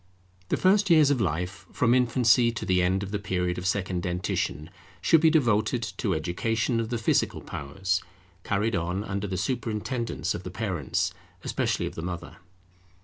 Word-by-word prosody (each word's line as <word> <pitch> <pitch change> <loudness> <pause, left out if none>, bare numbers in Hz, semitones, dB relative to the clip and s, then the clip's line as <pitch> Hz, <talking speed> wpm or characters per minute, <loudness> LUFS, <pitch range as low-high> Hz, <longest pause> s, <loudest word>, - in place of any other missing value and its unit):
The - - +1
first 195 +1 +3
years 155 -4 +6
of 130 -5 +1
life, 90 +1 -2
from 120 -1 +2
infancy 125 -1 +4
to 115 - -4
the 90 -1 +3
end 95 +2 +1
of 100 - -6
the 105 - -1
period 90 -3 -1
of 90 - -3
second 95 -2 -1
dentition, 90 -3 -2 0.3
should 165 - +4
be 160 - +6
devoted 120 -6 +2
to - - 0
education 115 +9 0
of 115 -1 -2
the 120 - -1
physical 115 - +1
powers, 95 +7 -2 0.4
carried 105 +2 0
on 90 +3 -1
under 100 -1 -3
the 95 -1 -3
superintendence 110 - -2
of 85 - -5
the 90 - -7
parents, 90 - -2 0.3
especially - - -1
of - - -5
the - - -6
mother. 85 0 -6
100 Hz, 170 wpm, -27 LUFS, 90-115 Hz, 0.4 s, years